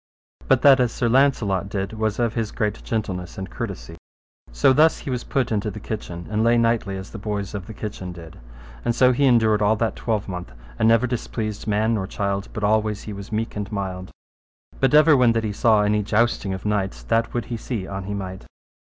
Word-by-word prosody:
But 130 -2 +3
that 140 -2 +7
as 125 -2 +2
Sir 120 - -1
Launcelot 115 -7 +2
did 100 +1 -3
was 110 -1 -1
of 120 -2 0
his 115 -2 -2
great 105 -1 -2
gentleness 95 -6 -3
and 95 -1 -6
courtesy. - - -6 0.5
So - - +4
thus 155 +3 +4
he 135 - -6
was 125 -1 -2
put 130 -4 -1
into 105 0 0
the 105 - -7
kitchen, 90 -5 -6
and 110 +1 +1
lay 120 +1 +4
nightly 115 -4 +1
as 95 0 -8
the 110 - -7
boys 100 -1 -4
of 100 -3 -6
the 110 - -8
kitchen 100 -4 -6
did. 85 -2 -11 0.4
And 120 - 0
so 125 0 +5
he 140 +3 +2
endured 110 -4 +4
all 105 +1 +3
that 110 +1 -1
twelvemonth, 95 - -3 0.3
and 110 - +4
never 115 +2 +4
displeased 110 -4 -4
man 110 +2 +1
nor 95 -4 -1
child, 100 -1 -2
but 110 - -5
always 105 0 +1
he 105 - -6
was 100 +1 -9
meek 110 +1 -2
and 105 +1 -4
mild. 95 -2 -4 0.7
But 135 +2 +3
ever 155 0 +7
when 125 -3 +4
that 115 -1 0
he 105 -2 -2
saw 110 0 +3
any 105 +1 +2
jousting 110 -1 +1
of 95 - -10
knights, 105 -2 -1
that 115 +1 0
would 120 - -1
he - - -2
see 110 -3 -4
an 95 0 -6
he 100 +1 -4
might. 95 -1 -6
105 Hz, 215 wpm, -23 LUFS, 100-115 Hz, 0.7 s, that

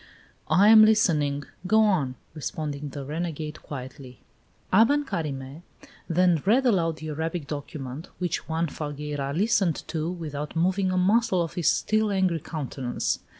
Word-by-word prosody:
"I 200 +3 +5
am 220 -1 +9
listening; 155 -10 +3 0.2
go 220 +3 +5
on," 170 -12 +2 0.2
responded 150 -2 -5
the 140 -2 -6
renegade 155 0 -4
quietly. 130 -2 -9 0.5
Aben 280 +9 +4
Carime 140 - -4 0.5
then 175 -2 +3
read 240 +7 +3
aloud 170 -9 +2
the 155 0 -7
Arabic 160 +1 -3
document, 145 0 -6
which 175 -3 -3
Juan 165 +1 0
Falgueira 145 -2 -4
listened 190 0 +1
to 160 0 -2
without 150 -4 -5
moving 185 +3 +1
a 185 - 0
muscle 190 -1 +3
of 165 - -6
his 175 -4 +2
still 215 0 +1
angry 185 -4 +1
countenance. 135 -5 -3
165 Hz, 140 wpm, -26 LUFS, 145-185 Hz, 0.5 s, am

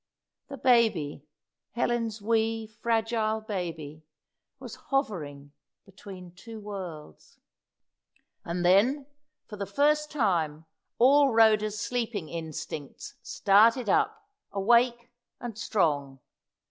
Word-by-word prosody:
The 275 - -7
baby 210 - +2 0.5
Helen's 230 -3 -1
wee, 225 0 0
fragile 220 0 -1
baby 165 -8 -6 0.5
was - - -9 0.2
hovering 150 - -2 0.3
between 185 -2 -11
two 225 +4 -10
worlds. 190 -7 -9 1.1
And 175 +1 -3
then, 240 +11 +4 0.4
for 210 - -10
the 200 -1 -4
first 300 +1 +2
time, 165 - 0 0.3
all 275 +3 +5
Rhoda's 215 -2 +3
sleeping 220 -6 -3
instincts 155 -3 -7
started 220 +3 +3
up, 430 - +1 0.2
awake 235 +4 +2 0.3
and 240 -3 -6
strong. 145 - -1
215 Hz, 95 wpm, -28 LUFS, 175-235 Hz, 1.1 s, all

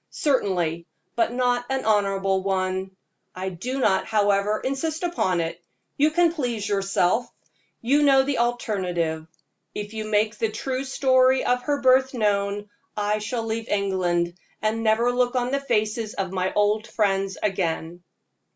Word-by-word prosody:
"Certainly, 180 - 0 0.3
but 230 0 +1
not 245 0 +1
an 265 0 -1
honorable 195 -2 +1
one. 190 0 -1 0.5
I 185 +1 -3
do 245 +10 -4
not, 200 -7 +2
however, 205 0 +2
insist 310 +5 -3
upon 190 - 0
it; 165 +1 -5 0.3
you 295 +2 +3
can 340 +1 +3
please 240 -9 -2
yourself. 195 +2 +1 0.5
You 275 +5 +3
know 270 -2 +5
the 275 -2 -1
alternative 180 -9 -1 0.5
if 210 +1 -5
you 220 -1 -4
make 215 +1 0
the 225 - +1
true 260 +5 -3
story 260 -1 +3
of 250 0 +1
her 285 +2 -1
birth 260 0 +4
known, 205 -2 0 0.3
I 210 0 0
shall 225 +2 -3
leave 225 +1 -3
England, 180 -4 0 0.3
and 215 +2 -1
never 225 +2 +3
look 245 +1 +1
on 250 0 0
the 280 - +1
faces 215 -4 -1
of 190 -2 -3
my 185 0 -1
old 210 +1 +1
friends 195 -2 0
again." 175 -3 -2
215 Hz, 150 wpm, -24 LUFS, 195-250 Hz, 0.5 s, know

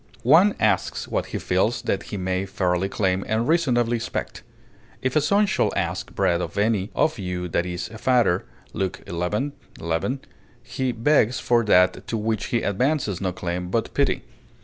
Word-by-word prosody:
One 170 - +6
asks - - +1
what - - -2
he - - -4
feels 100 +6 0
that 100 - 0
he 105 - -4
may 95 +1 -1
fairly 90 0 0
claim 95 -1 0
and 110 +2 0
reasonably 120 -8 +2
expect; 115 - -4 0.6
"if 130 +2 0
a 155 - +5
son 200 +8 +3
shall 200 - +1
ask - - -3
bread 85 0 +2
of 85 +1 -5
any 105 -1 +1
of 155 -6 +1
you 90 -2 -3
that 85 +2 0
is 90 +4 -4
a 110 0 -10
father," 120 -9 +3 0.3
Luke 95 -2 -3
xi, - - -9 0.7
11; 85 +12 -2 0.4
he 125 +2 -2
begs 120 0 +2
for 120 -1 +2
that 90 -2 +3
to 115 - -2
which 110 -1 -1
he 120 - 0
advances 110 - 0
no 95 -2 0
claim 90 0 -4
but 115 +4 -1
pity. 140 -1 +1
110 Hz, 170 wpm, -24 LUFS, 90-125 Hz, 0.7 s, One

